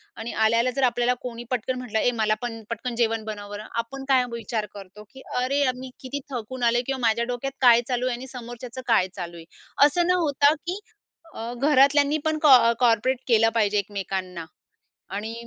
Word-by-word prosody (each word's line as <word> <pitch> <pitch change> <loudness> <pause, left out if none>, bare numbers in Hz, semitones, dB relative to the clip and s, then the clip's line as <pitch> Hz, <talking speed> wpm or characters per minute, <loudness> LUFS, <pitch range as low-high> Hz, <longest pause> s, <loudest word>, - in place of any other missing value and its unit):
आणि 225 +1 -6
आल्या-आल्या 230 +3 +2
जर 275 - 0
आपल्याला 245 +1 +1
कोणी 240 -1 -6
पटकन 255 +1 -1
म्हटलं, 235 -3 -2
"ए 245 - +2
मला 215 0 +3
पण 225 -2 -5
पटकन 230 +1 -4
जेवण 225 -2 0
बनवं 205 -2 -7
बर." 205 0 -6
आपण 250 +4 -4
काय 260 -2 +5
विचार 230 -2 -3
करतो. 200 +1 -11
की 265 - -14 0.2
"अरे 275 +3 0
यार, 260 -3 +2
मी 260 0 -8
किती 275 +2 -5
थकून 245 +1 -5
आलेय," 240 +1 +3
किंवा 270 -1 -2
"माझ्या 235 +1 +1
डोक्यात 250 +2 -4
काय 240 -2 +7
चालू 250 0 -1
आहे 245 - -1
आणि 260 +2 -9
समोरच्याचं 240 0 -8
काय 220 -5 +3
चालू 170 -2 -6
आहे." 165 - -11 0.4
असं 345 +4 +2
न - - +3
होता 290 -1 +3
की 350 +5 -5 0.5
अ, 230 +2 -6
घरातल्यांनी 285 +2 +4
पण 315 0 +1
कॉ 250 -5 +7
कोऑपरेट 245 +2 +3
केलं 225 -1 +4
पाहिजे 210 -2 +2
एकमेकांना 190 -4 -4 0.7
आणि 220 +2 -4
240 Hz, 190 wpm, -24 LUFS, 220-260 Hz, 0.7 s, काय